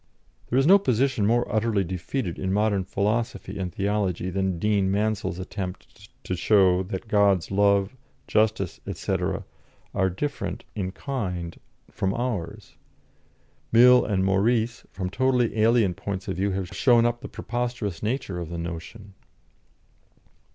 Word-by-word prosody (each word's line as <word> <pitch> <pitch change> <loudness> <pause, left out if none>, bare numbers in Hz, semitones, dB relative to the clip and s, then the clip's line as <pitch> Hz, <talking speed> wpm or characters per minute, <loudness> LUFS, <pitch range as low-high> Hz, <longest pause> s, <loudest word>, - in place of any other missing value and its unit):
There 125 - +1
is 135 - +4
no 195 +5 +7
position 125 - +1
more 120 +2 +2
utterly 110 -2 +1
defeated 90 +3 -4
in 95 0 -1
modern 100 -1 +1
philosophy 105 0 -2
and 90 -2 -3
theology 95 -2 -1
than 95 -1 -1
Dean 100 +1 +1
Mansel's 105 -2 -1
attempt 95 +2 -7
to 90 - -2
show 95 -1 +4
that 95 +4 -5
God's 100 -5 +2
love, 100 +2 +2 0.3
justice, 105 -5 +1
&c., 95 +2 -3 0.8
are 95 -1 +2
different 120 +11 -4
in 95 -3 -3
kind 90 -10 -4 0.3
from 95 +1 -1
ours. 115 -9 -4 0.9
Mill 125 +2 +7
and 95 -3 0
Maurice, 110 +4 +1
from 90 -1 -5
totally 125 +1 +1
alien 110 -3 +4
points 95 +1 -5
of 95 -3 -3
view, 100 +2 +1
have 95 -2 -3
shown 120 0 +4
up 120 0 0
the - - -6
preposterous 120 -6 -3
nature 110 -5 -2
of 85 -2 -5
the 85 - -5
notion. 85 +5 -7
100 Hz, 135 wpm, -25 LUFS, 95-115 Hz, 0.9 s, no